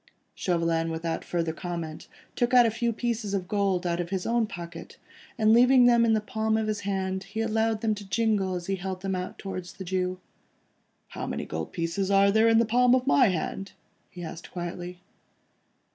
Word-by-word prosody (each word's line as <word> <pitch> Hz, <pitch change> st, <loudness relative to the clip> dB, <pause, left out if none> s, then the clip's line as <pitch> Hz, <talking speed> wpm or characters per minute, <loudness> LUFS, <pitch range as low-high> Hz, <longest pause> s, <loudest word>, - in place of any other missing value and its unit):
Chauvelin 165 Hz, -2 st, 0 dB
without 165 Hz, 0 st, -3 dB
further 165 Hz, -2 st, -2 dB
comment 165 Hz, -2 st, -6 dB, 0.3 s
took 240 Hz, +1 st, 0 dB
a 240 Hz, -2 st, +6 dB
few 235 Hz, +1 st, 0 dB
pieces 230 Hz, -3 st, -2 dB
of 185 Hz, -2 st, -3 dB
gold 195 Hz, -3 st, 0 dB
out 170 Hz, 0 st, 0 dB
of 175 Hz, -1 st, -3 dB
his 190 Hz, -1 st, -2 dB
own 230 Hz, -1 st, +1 dB
pocket, 170 Hz, -5 st, -9 dB, 0.4 s
and 220 Hz, -1 st, +4 dB
leaving 250 Hz, +1 st, +6 dB
them 235 Hz, -1 st, +5 dB
in 225 Hz, -, +3 dB
the 215 Hz, -, +3 dB
palm 220 Hz, +1 st, -1 dB
of 220 Hz, -, 0 dB
his 215 Hz, -1 st, -2 dB
hand, 190 Hz, -1 st, -2 dB
he 200 Hz, +3 st, -6 dB
allowed 225 Hz, 0 st, 0 dB
them 220 Hz, -1 st, +1 dB
to 205 Hz, -2 st, -9 dB
jingle 205 Hz, -4 st, +1 dB
as 175 Hz, -1 st, -5 dB
he 195 Hz, +1 st, -1 dB
held 185 Hz, 0 st, -5 dB
them 195 Hz, 0 st, -1 dB
out 180 Hz, 0 st, -4 dB
towards 185 Hz, -2 st, -6 dB
the 190 Hz, -, -8 dB
Jew. 185 Hz, 0 st, -2 dB, 0.9 s
"How -, -, -6 dB
many -, -, -3 dB
gold 80 Hz, 0 st, -5 dB
pieces 170 Hz, +3 st, -2 dB
are 200 Hz, 0 st, +5 dB
there 220 Hz, +2 st, +4 dB
in 225 Hz, 0 st, +5 dB
the 230 Hz, -, +4 dB
palm 245 Hz, +3 st, +4 dB
of 255 Hz, -1 st, 0 dB
my 270 Hz, -2 st, +5 dB
hand?" 195 Hz, +2 st, -3 dB, 0.4 s
he 175 Hz, -, -9 dB
asked 165 Hz, 0 st, -8 dB
quietly. 175 Hz, 0 st, -6 dB
195 Hz, 195 wpm, -27 LUFS, 175-220 Hz, 0.9 s, a